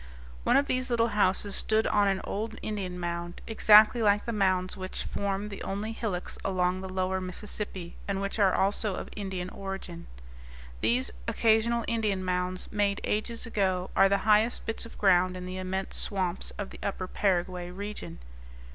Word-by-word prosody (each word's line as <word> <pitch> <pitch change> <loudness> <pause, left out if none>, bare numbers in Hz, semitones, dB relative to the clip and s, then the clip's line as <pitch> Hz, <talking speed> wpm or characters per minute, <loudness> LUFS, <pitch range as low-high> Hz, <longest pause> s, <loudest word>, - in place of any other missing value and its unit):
One - - +5
of 280 - +3
these 255 -1 -1
little 235 -1 +2
houses 205 -1 +2
stood 220 0 +2
on 205 -1 +3
an 195 -1 +1
old 220 +2 -4
Indian 195 -4 -3
mound, 175 0 -4
exactly 220 +1 +6
like 205 -1 +3
the 235 - -2
mounds 185 -3 +1
which 185 0 -4
form 200 +1 -2
the 200 - -8
only 205 +3 -3
hillocks 210 -5 -4
along 185 -1 0
the 190 - -6
lower 185 0 -1
Mississippi, 185 -1 -4
and 195 -1 -1
which 200 +2 -3
are 195 -2 +5
also 200 +1 +1
of - - -6
Indian 190 -3 -4
origin. 195 -3 -7 0.7
These 120 - +1 0.2
occasional 230 +1 +2
Indian 210 -5 0
mounds, 180 0 -2
made 205 -1 +1
ages 225 +2 -2
ago, 190 -5 0
are 195 - +6
the 200 - +3
highest 215 +2 +3
bits 225 0 -2
of - - -14
ground 185 -2 +3
in 180 - -6
the 185 +1 -5
immense 190 +1 -3
swamps 185 -3 -1
of 205 -2 -5
the - - -11
upper 190 -2 -3
Paraguay 180 -2 -1
region. 185 - -6
195 Hz, 170 wpm, -29 LUFS, 185-210 Hz, 0.7 s, exactly